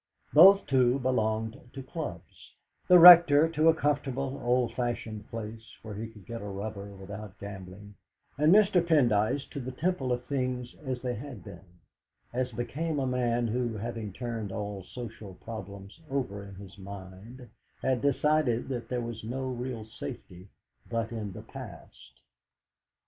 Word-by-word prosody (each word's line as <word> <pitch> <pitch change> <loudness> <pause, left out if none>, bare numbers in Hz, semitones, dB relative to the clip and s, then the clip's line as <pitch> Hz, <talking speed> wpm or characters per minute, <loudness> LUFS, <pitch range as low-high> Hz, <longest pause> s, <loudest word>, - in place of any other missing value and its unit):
Both, 195 +1 +8
too, 130 -1 +3
belonged 110 -2 -1
to 135 - -7
clubs 130 - -8 0.3
the 180 - +8
Rector 165 -3 +10
to 160 0 +3
a 165 - +4
comfortable, 140 -2 -1
old 125 -1 +1
fashioned 115 -3 -4
place 115 -1 -6 0.2
where 110 -1 -7
he 110 +3 -5
could 105 -4 -15
get 115 -1 -6
a 105 - -6
rubber 100 0 -5
without 100 +1 -9
gambling, 100 0 -9 0.4
and 150 +3 +3
Mr. 195 -3 +5
Pendyce 135 -5 +2
to 145 - -5
the 130 0 -5
Temple 140 -2 -1
of 125 0 -2
things 125 -3 -2
as 130 -3 -4
they 125 -1 -1
had 120 -4 -8
been, 90 -2 -13 0.5
as 125 +1 -1
became 150 +6 -3
a 135 - 0
man 120 -2 0
who, 120 -1 -1
having 110 -1 -5
turned 115 -1 -5
all 100 0 -4
social 110 -3 -9
problems 100 - -9
over 125 -8 -3
in 100 -1 -11
his 100 +1 -12
mind, 100 +6 -10 0.4
had 130 -2 +1
decided 140 -3 +1
that 125 -3 -4
there 125 -1 -1
was 115 -2 -6
no 130 +4 -3
real 125 -3 -5
safety 90 -4 -9 0.4
but 115 -1 -2
in 110 -3 -4
the - - -9
past. - - -12
120 Hz, 155 wpm, -29 LUFS, 105-135 Hz, 0.5 s, Rector